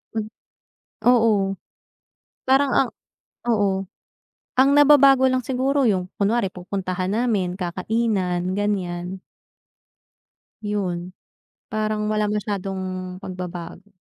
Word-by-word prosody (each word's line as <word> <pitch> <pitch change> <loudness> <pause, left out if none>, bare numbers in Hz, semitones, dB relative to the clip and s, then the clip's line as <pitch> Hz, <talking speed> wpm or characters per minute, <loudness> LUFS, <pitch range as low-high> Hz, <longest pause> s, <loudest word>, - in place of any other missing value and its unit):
M 220 - 0 0.9
Oo, 215 -5 +3 0.9
parang 270 0 +4
ang 260 - +3 0.6
oo, 205 -3 +3 0.9
ang 265 +2 +5
nababago 275 -2 +7
lang 255 -1 +1
siguro, 270 +3 0
'yong 190 -6 +2
kunwari 205 -1 0
pupuntahan 185 0 -3
namin, 205 -5 0
kakainan, 185 -1 -1
ganiyan. 190 -3 -2 1.4
'Yon. 185 -4 -3 0.6
Parang 215 0 -1
wala 215 -1 0
masyadong 190 -3 -3
pagbabago. 180 +1 -8
205 Hz, 85 wpm, -23 LUFS, 185-230 Hz, 1.4 s, nababago